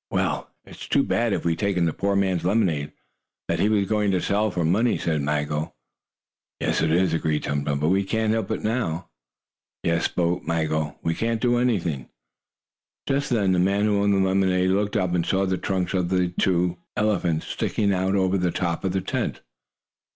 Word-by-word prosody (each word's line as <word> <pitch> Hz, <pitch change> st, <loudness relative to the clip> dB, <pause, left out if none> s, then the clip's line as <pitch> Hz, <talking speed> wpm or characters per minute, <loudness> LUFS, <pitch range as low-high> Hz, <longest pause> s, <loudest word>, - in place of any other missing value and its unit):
"Well, -, -, -1 dB, 0.2 s
it's -, -, -10 dB
too -, -, +3 dB
bad -, -, 0 dB
if -, -, -2 dB
we've 85 Hz, -1 st, +2 dB
taken 95 Hz, -2 st, 0 dB
the 80 Hz, -, 0 dB
poor 100 Hz, 0 st, 0 dB
man's 95 Hz, -3 st, +1 dB
lemonade, 90 Hz, -7 st, +1 dB, 0.6 s
that -, -, -1 dB
he 105 Hz, -, +3 dB
was 100 Hz, -2 st, +2 dB
going 105 Hz, -1 st, +1 dB
to 95 Hz, -2 st, +2 dB
sell 105 Hz, +4 st, +1 dB
for 90 Hz, -4 st, -1 dB
money," 110 Hz, +9 st, +2 dB
said 80 Hz, -3 st, -1 dB
Maggo. 75 Hz, +1 st, -2 dB, 0.8 s
"Yes, -, -, 0 dB
it 80 Hz, -, +2 dB
is," 90 Hz, 0 st, +2 dB
agreed 80 Hz, -2 st, 0 dB
Tum 70 Hz, -1 st, -2 dB
Tum. 70 Hz, -1 st, -1 dB
"But 75 Hz, +2 st, +1 dB
we 95 Hz, +2 st, +2 dB
can't 110 Hz, +2 st, 0 dB
help 110 Hz, -3 st, -1 dB
it -, -, -3 dB
now." 105 Hz, -8 st, -2 dB, 0.7 s
"Yes," 85 Hz, 0 st, +1 dB
spoke 90 Hz, 0 st, 0 dB
Maggo. 80 Hz, -2 st, -1 dB
"We 80 Hz, -, +1 dB
can't 115 Hz, +4 st, -1 dB
do 120 Hz, +1 st, +2 dB
anything." 90 Hz, -, -1 dB, 1.0 s
Just 140 Hz, +1 st, 0 dB
then 105 Hz, -6 st, +2 dB
the 90 Hz, -, +2 dB
man 100 Hz, +3 st, +2 dB
who 105 Hz, -1 st, +2 dB
owned 100 Hz, 0 st, +3 dB
the 95 Hz, 0 st, +2 dB
lemonade 95 Hz, -1 st, +2 dB
looked 100 Hz, +2 st, 0 dB
up, 90 Hz, -2 st, 0 dB
and 85 Hz, -2 st, +1 dB
saw 95 Hz, +3 st, +1 dB
the 95 Hz, -1 st, -1 dB
trunks 95 Hz, -1 st, -1 dB
of 90 Hz, -2 st, 0 dB
the 90 Hz, -1 st, +1 dB
two 90 Hz, -1 st, 0 dB, 0.2 s
elephants 90 Hz, -7 st, +1 dB
sticking 100 Hz, -2 st, 0 dB
out 95 Hz, +1 st, 0 dB
over 95 Hz, 0 st, +2 dB
the 90 Hz, 0 st, +1 dB
top 85 Hz, -1 st, -2 dB
of 95 Hz, -2 st, -1 dB
the 95 Hz, -, 0 dB
tent. 90 Hz, -, -3 dB
95 Hz, 195 wpm, -24 LUFS, 85-100 Hz, 1.0 s, too